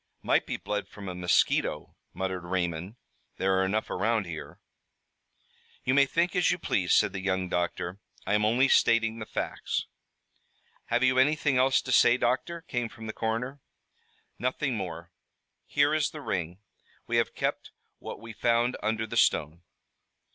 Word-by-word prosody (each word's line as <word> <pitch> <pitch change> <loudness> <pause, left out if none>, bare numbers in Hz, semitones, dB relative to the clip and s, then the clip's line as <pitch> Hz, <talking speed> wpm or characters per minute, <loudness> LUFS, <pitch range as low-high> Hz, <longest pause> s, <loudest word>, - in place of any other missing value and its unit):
"Might - - +2
be - - -2
blood 105 0 -3
from 100 -1 -10
a 90 - -4
mosquito," 90 0 +1 0.2
muttered 95 -2 -3
Raymond. 90 +2 -2 0.4
"There 95 0 +2
are - - +3
enough 105 +3 0
around 110 -2 +1
here." 80 -3 -8 1.2
"You 130 - +1
may 140 0 +5
think 170 +6 0
as 180 - +3
you 180 - +1
please," 95 - 0
said - - +4
the 95 - -3
young 95 -1 -1
doctor. 90 +1 -2 0.3
"I 95 - 0
am 105 0 +3
only 120 +5 +4
stating 115 -3 +3
the 110 - -6
facts." - - -3 1.0
"Have 120 +2 +1
you 130 0 +4
anything 150 0 +3
else 130 0 +3
to 130 - -4
say, 120 0 +6
doctor?" 130 +8 -1
came 120 -6 -3
from 110 -1 -11
the 110 - -5
coroner. 115 +5 -2 0.8
"Nothing 130 +1 -1
more. 85 -4 -6 0.6
Here 145 +1 +3
is 155 -1 +2
the 155 - -9
ring. 90 - -3 0.4
We - - 0
have - - 0
kept - - -2 0.3
what - - -7
we 115 0 -9
found 120 +2 +1
under 110 +1 -1
the 110 - -5
stone." 80 +4 +2
110 Hz, 160 wpm, -28 LUFS, 95-130 Hz, 1.2 s, say